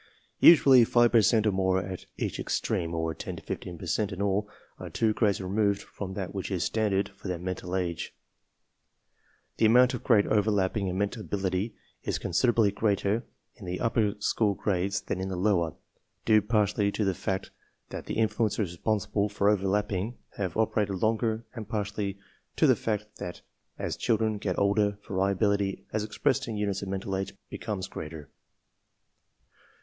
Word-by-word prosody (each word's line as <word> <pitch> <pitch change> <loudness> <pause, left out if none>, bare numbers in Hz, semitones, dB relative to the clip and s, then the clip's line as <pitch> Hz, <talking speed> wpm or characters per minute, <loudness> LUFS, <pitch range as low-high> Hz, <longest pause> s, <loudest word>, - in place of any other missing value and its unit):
Usually 135 -6 +8
5 120 +1 +4
per 115 - +6
cent 110 +1 +3
or 105 - +4
more 95 -1 +1
at 95 -1 -6
each - - -3
extreme, 85 0 -1
or 80 0 -1
10 - - -6
to - - -10
15 90 -1 -5
per - - -8
cent 105 -2 0
in 95 - -6
all, 100 +1 0 0.3
are - - -7
two 110 -1 +1
grades 105 -3 +1
removed 100 +1 0
from 95 -2 -7
that 95 -3 -4
which 95 -2 -4
is 95 -3 -1
standard 100 -2 0
for - - -11
their 90 -1 -2
mental 90 +1 -4
age. 85 -3 -2 1.5
The 110 - +5
amount 125 +3 +6
of 125 - -5
grade 110 -5 +4
overlapping 105 -2 +1
in 90 0 -2
mental 100 +3 -1
ability 95 +1 -2 0.3
is - - -2
con - - -5
siderably 110 +1 +3
greater 105 +2 0 0.3
in 105 - -12
the 90 +1 -3
upper 110 -2 +1
school 105 0 +1
grades 100 0 -1
than 95 - -3
in 95 - -3
the 95 - -3
lower, 90 -4 +1 0.5
due 110 -1 +5
partly 105 -1 +1
to 105 - 0
the 95 - +2
fact 95 +2 -3 0.4
that - - -7
the - - -3
influences 110 -3 +1
responsible 105 +2 0
for 100 0 +2
overlapping 105 +2 0 0.2
have 95 -3 -3
operated 105 -2 +1
longer 110 +2 0
and 110 -4 -7
partly 105 -2 -2 0.4
to - - +3
the - - +6
fact 105 -2 -2
that 90 - -7 0.3
as - - -3
children 110 -1 0
get 95 -3 -2
older 100 0 +2
variability 100 +1 +1
j 95 - -14
as 110 0 0
expressed 130 +5 0
in 110 -2 -3
units 100 -2 -1
of 100 - -5
mental 95 0 -3
age 95 +1 -3 0.2
becomes 100 -4 -4
greater. 75 -2 -8
100 Hz, 175 wpm, -28 LUFS, 95-110 Hz, 1.5 s, Usually